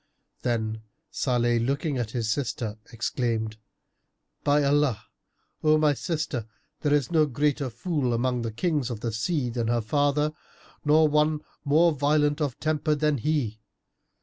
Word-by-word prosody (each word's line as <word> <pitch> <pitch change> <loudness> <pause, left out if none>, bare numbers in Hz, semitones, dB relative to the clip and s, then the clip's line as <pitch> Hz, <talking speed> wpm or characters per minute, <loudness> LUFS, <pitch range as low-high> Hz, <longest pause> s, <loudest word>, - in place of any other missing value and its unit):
Then 110 -3 -1 0.3
Salih, 120 -2 +1
looking 140 +3 -1
at 115 -3 -2
his 115 -1 -2
sister, 115 -3 -2
exclaimed, 115 -2 -2 0.9
"By 145 0 +3
Allah, 140 -6 +2 0.6
O 155 0 +5
my 155 -1 +3
sister, 150 -6 -3 0.3
there 145 - 0
is 145 -2 +2
no 155 -2 +4
greater 145 +1 0
fool 130 +1 -1
among 125 +1 0
the 115 -1 -3
Kings 145 - 0
of 115 -3 -5
the 115 - -2
sea 125 - -1
than 115 -1 -2
her 120 0 +2
father 145 +5 +1 0.5
nor 155 +1 +5
one 150 0 +2 0.2
more 160 +4 +4
violent 150 +1 +2
of 140 -5 -2
temper 155 0 +1
than 150 -2 +1
he! 125 -6 -1
140 Hz, 145 wpm, -26 LUFS, 120-150 Hz, 0.9 s, O